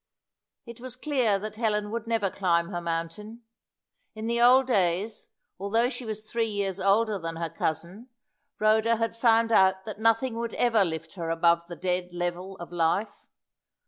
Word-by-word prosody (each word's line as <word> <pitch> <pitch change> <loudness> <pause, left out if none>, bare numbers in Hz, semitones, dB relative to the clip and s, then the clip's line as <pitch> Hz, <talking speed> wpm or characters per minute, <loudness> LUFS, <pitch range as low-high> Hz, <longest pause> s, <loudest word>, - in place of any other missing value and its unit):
It 235 -1 -11
was 250 0 -7
clear 250 -7 +1
that 215 +2 -7
Helen 210 -2 0
would 230 0 -4
never 225 -4 0
climb 170 -2 +1
her 175 -3 -4
mountain. 170 +8 -5 0.7
In 215 0 -6
the 235 +1 0
old 255 +2 +6
days, 200 -2 0 0.3
although 225 +5 +1
she 250 -1 -6
was 215 0 -6
three 230 0 -1
years 200 -2 -2
older 205 +2 +2
than 165 -1 -5
her 165 -1 -4
cousin, 170 - -4 0.5
Rhoda 220 +2 +3
had 225 0 -2
found 230 -1 +3
out 190 -2 +4
that 215 -1 -7
nothing 225 +2 +1
would 235 -1 -4
ever 230 -4 +3
lift 165 -2 -5
her 170 -4 -5
above 170 +1 +2
the 175 - -7
dead 180 0 -2
level 175 +2 -4
of 175 -1 -9
life. 175 +5 -1
210 Hz, 170 wpm, -27 LUFS, 175-230 Hz, 0.7 s, old